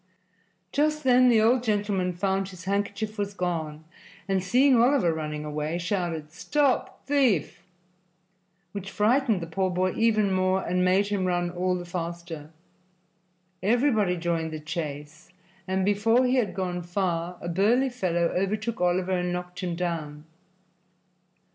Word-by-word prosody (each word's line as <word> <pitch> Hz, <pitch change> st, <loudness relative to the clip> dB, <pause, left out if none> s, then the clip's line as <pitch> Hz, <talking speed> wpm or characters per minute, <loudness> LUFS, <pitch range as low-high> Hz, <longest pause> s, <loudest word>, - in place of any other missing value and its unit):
Just 305 Hz, +1 st, +1 dB
then 255 Hz, -1 st, +5 dB
the 230 Hz, -2 st, +5 dB
old 235 Hz, +3 st, +4 dB
gentleman 205 Hz, -5 st, 0 dB
found 190 Hz, +1 st, -1 dB
his 185 Hz, -2 st, -11 dB
handkerchief 205 Hz, +2 st, -2 dB
was 200 Hz, 0 st, -2 dB
gone 160 Hz, -4 st, -3 dB, 0.4 s
and, 190 Hz, -2 st, 0 dB
seeing 255 Hz, +8 st, +4 dB
Oliver 245 Hz, -, +3 dB
running 150 Hz, -1 st, -4 dB
away, 150 Hz, +2 st, -3 dB
shouted 170 Hz, -4 st, -3 dB
"Stop 280 Hz, -, 0 dB
thief!" 260 Hz, -, +1 dB, 1.1 s
which 195 Hz, -1 st, -6 dB
frightened 220 Hz, 0 st, +2 dB
the -, -, -3 dB
poor 185 Hz, +3 st, -1 dB
boy 185 Hz, +1 st, 0 dB
even 215 Hz, -3 st, +2 dB
more 185 Hz, 0 st, +1 dB
and 180 Hz, +1 st, 0 dB
made 190 Hz, +3 st, +3 dB
him 200 Hz, -2 st, 0 dB
run 175 Hz, -1 st, 0 dB
all 180 Hz, +1 st, 0 dB
the 175 Hz, -1 st, -5 dB
faster. 170 Hz, -3 st, -6 dB, 1.1 s
Everybody 215 Hz, -3 st, +2 dB
joined 165 Hz, -1 st, -1 dB
the 155 Hz, -, -5 dB
chase, 155 Hz, 0 st, -6 dB, 0.4 s
and 190 Hz, 0 st, 0 dB
before 225 Hz, +5 st, +3 dB
he 255 Hz, +1 st, +2 dB
had 205 Hz, -8 st, 0 dB
gone 180 Hz, -2 st, -2 dB
far 175 Hz, -1 st, -2 dB
a -, -, -7 dB
burly 215 Hz, +10 st, +2 dB
fellow 175 Hz, -8 st, 0 dB
overtook 210 Hz, +4 st, -1 dB
Oliver 180 Hz, +1 st, +1 dB
and 180 Hz, -1 st, 0 dB
knocked 180 Hz, 0 st, -5 dB
him 180 Hz, -2 st, -2 dB
down. 160 Hz, -4 st, -4 dB
185 Hz, 140 wpm, -26 LUFS, 175-215 Hz, 1.1 s, then